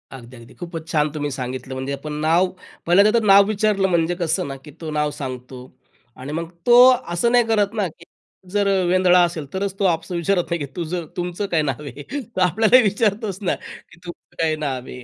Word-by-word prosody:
अगदी, 125 0 -12
अगदी 115 0 -15
खूपच 170 -2 -8
छान 150 -1 +2
तुम्ही 145 -1 -3
सांगितलं. 130 +1 -5
म्हणजे 130 +1 -4
आपण 150 +2 -6
नाव 165 +4 +3 0.4
पहिले 180 +4 +5
त्याचं 220 +1 +2
नाव 200 0 +8
विचारलं, 205 -2 +1
म्हणजे 170 -1 +1
कसं 170 -1 -1
ना, 135 - -6
की 145 +2 -14
तो 155 -1 -5
नाव 150 0 0
सांगतो 130 -2 -7 0.6
आणि 135 +3 -8
मग 165 +1 -4 0.2
तो 240 0 +6 0.4
असं 235 +8 +1
नाही 245 -1 +5
करत 210 -2 +1
ना, 205 -4 -1
की 170 +1 -15 0.5
जर 205 -1 +1 0.2
वेंधळा 180 0 +4
असेल 170 -4 -2
तरच 195 0 -2
तो - - 0
आपस 165 0 0
विचारत 175 +1 0
नाही 170 -1 -1
की 145 - -3
तुझं 170 0 -4
तुमचं 180 +3 -3
काय 160 -2 +2
नाव 145 -1 -3
आहे, 140 +2 -9 0.3
तर 185 - -1
आपल्याला 220 +7 +4
विचारतोच 205 -1 0
ना 190 - 0
की 170 - -14
तुमचं 175 - -12
काय 160 -1 +1
नाव 135 -4 -4
आहे. 125 - -9
170 Hz, 205 wpm, -21 LUFS, 150-195 Hz, 0.6 s, नाव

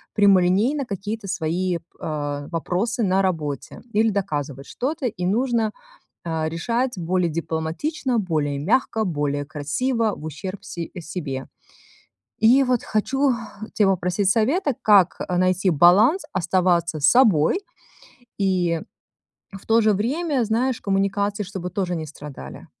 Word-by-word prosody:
прямолинейно 205 +7 +3
какие-то 205 +1 -5
свои, 180 0 -1 0.2
а, 145 -2 -4
вопросы 210 +8 -1
на 190 0 +2
работе 155 -7 -3
или 220 +1 +3
доказывать 145 -9 -3
что-то, 275 0 -2
и 180 -5 -4
нужно, 225 +2 +1 0.5
а, 160 -1 -1
решать 235 +10 -1
более 175 +1 0
дипломатично, 170 - -2
более 155 -7 -1
мягко, 220 - +1
более 145 -4 -1
красиво, 215 - -1
в 150 - -11
ущерб 185 +6 -6
се 170 -1 -6
а, - - -4
себе. 150 -6 -5 0.9
И 245 +5 +6
вот 250 -2 0
хочу 270 +6 +1 0.4
тя 210 - +3
попросить 185 +1 +1
совета, 270 - +2
как, 200 -5 +5
э, 180 -1 -2
найти 185 +1 +2
баланс, 200 - +5
оставаться 175 -2 +1
собой 175 - +4 0.8
и 180 -3 +1 0.7
в 195 0 -11
то 225 +1 +4
же 215 -1 +4
время, 270 - 0
знаешь, 235 +3 0
коммуникации 200 +1 0
чтобы 180 -1 -6
тоже 180 -1 -2
не 160 - -4
страдали. 145 - -10
190 Hz, 125 wpm, -23 LUFS, 165-225 Hz, 0.9 s, И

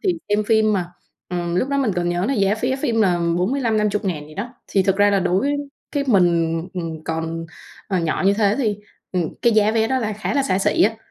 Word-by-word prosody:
thì 365 - +2
xem 210 +1 +1
phim 220 0 +3
mà, 180 -3 -2 0.4
ừm, 175 -1 -2
lúc 255 +9 +1
đó 280 - 0
mình 250 -8 +1
còn 175 0 0
nhớ 175 +2 0
là 275 - 0
giá 200 -2 +2
vé 260 +2 0
phim 245 -5 0
là 180 -4 +2 0.2
45.000-50.000 210 - 0
gì 155 - -13
đó. 235 - -5
Thì 195 - +2
thực 195 0 +1
ra 205 0 +4
là 200 - +2
đối 185 +9 +1 0.4
cái 285 -2 0
mình, 170 -6 +3
ừm, 165 -3 -5
còn, 165 0 -3 0.4
ờ, 190 -3 0
nhỏ 165 +1 -1
như 200 - +4
thế 205 -1 +2
thì, 215 -6 0 0.4
ừm, 175 -3 -1
cái 235 - +4
giá 215 -1 +4
vé 225 0 +1
đó 260 +1 +1
là 215 -3 -2
khá 215 +6 -3
là 280 - +2
xa 185 -6 +1
xỉ 195 - +2
á, 225 +2 +2
200 Hz, 230 wpm, -21 LUFS, 175-225 Hz, 0.4 s, ra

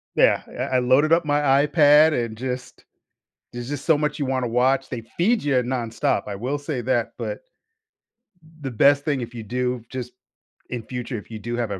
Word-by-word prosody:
Yeah, - - +4 0.2
I 130 - -1
I - - +4
loaded 130 +6 +3
up 170 0 +3
my 145 0 +2 0.3
iPad 150 0 +5
and 110 -1 -9
just 125 0 -6 0.7
there's 120 +1 -6
just 145 -1 -5
so 160 -3 +4
much 150 0 -2
you 140 - 0
wanna 130 -2 -1
watch. 130 +3 +1
They 125 -3 -5 0.2
feed 215 +4 +2
ya 140 -3 +2
nonstop, 120 -3 -1
I 100 - -4
will 130 +8 -2
say 145 -4 -4
that, 120 -2 0
but - - -4 1.2
the 135 -2 -4
best 140 +5 +4
thing 145 -4 0
if 120 0 -7
you 115 - -6
do 125 +1 -2
just 125 -1 -6 0.6
in 120 -3 -4
future, 125 0 -5
if 105 - -10
you 110 - -6
do 120 +3 -4
have 115 -4 -2
a 95 - -4
130 Hz, 200 wpm, -23 LUFS, 120-145 Hz, 1.2 s, iPad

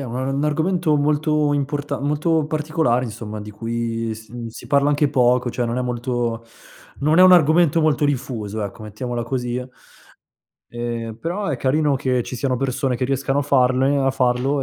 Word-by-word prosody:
è - - -4
un 120 -2 -6
un 135 +3 -1
argomento 160 +1 +1
molto 150 0 +1
importa 145 0 -2
molto 150 +2 +1
particolare 150 -5 0
insomma 110 -2 -6
di 105 0 -8
cui 115 +1 -3
s 110 +1 -11 0.2
si 110 - -11
parla 140 0 +3
anche 145 0 +2
poco 125 -2 +2
cioè 120 0 -2
non 115 +2 -2
è 125 - 0
molto 120 -1 -2 0.6
non 155 +4 +3
è 185 - +8
un 185 - +8
argomento 165 -1 +5
molto 155 -1 +2
diffuso 115 -7 -2
ecco 100 +2 -8
mettiamola 120 +3 -4
così 125 0 -2 1.1
Ehm, 120 -1 -4
però 185 +5 -3
è 150 - -1
carino 140 +3 +1
che 130 -2 0
ci - - -6
siano 130 +1 -1
persone 130 0 -1
che 130 - -1
riescano 135 +1 0
a - - +2
farne 135 0 +2
a 135 0 +2
farlo 130 +2 +1
135 Hz, 175 wpm, -21 LUFS, 120-145 Hz, 1.1 s, è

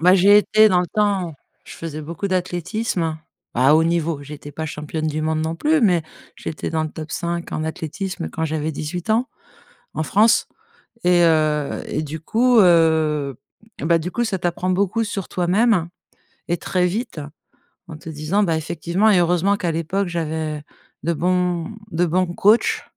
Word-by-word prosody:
Bah, 180 +3 +6
j'ai 200 +2 +6
été 215 +1 +5
dans 180 -2 +3
le 180 - -2
temps, 195 -6 0 0.3
je - - -11
faisais 155 -2 -6
beaucoup 170 +6 -4
d'athlétisme 175 -2 -2 0.4
à 130 +5 +5
haut 160 +1 +4
niveau, 165 -3 0
j'étais 145 0 -10
pas 160 +2 -4
championne 155 +1 -4
du 155 0 -2
monde 155 0 0
non 160 +1 -2
plus, 305 - +2
mais 180 -7 +3 0.3
j'étais 155 - -5
dans 160 -1 -1
le 155 - -5
top 155 -2 -8
5 170 +1 -3
en 155 - -2
athlétisme, 165 +4 -4
quand 160 - -3
j'avais 155 0 -2
18 160 +7 -5
ans, 235 +4 +2 0.7
en 155 - -1
France 215 +6 +3 0.6
et 180 -1 +4
heu 155 -3 +1
et 155 - -2
du 155 +1 -5
coup, 240 +7 +3
heu, 160 - +3 0.4
et - - -4
bah, 165 0 +3
du 175 +3 -4
coup, 240 +4 -1
ça 200 -4 -2
t'apprend 180 +1 -1
beaucoup 200 +4 +1
sur 195 -3 -4
toi-même 185 0 +2 0.6
et 175 0 0
très 180 -1 0
vite 195 -3 -3 0.7
en 155 - -9
te 160 - -10
disant, 160 +7 0
bah, 165 -4 +1
effectivement 170 +6 0
et 195 - +5
heureusement 180 +3 +2
qu'à 175 -4 -1
l'époque, 175 +4 -1
j'avais 160 -2 -3 0.4
de 170 +2 +1
bons 180 +1 0 0.2
de 175 +2 +1
bons 180 +2 +1
coachs. 205 +6 +2
170 Hz, 175 wpm, -21 LUFS, 155-190 Hz, 0.7 s, Bah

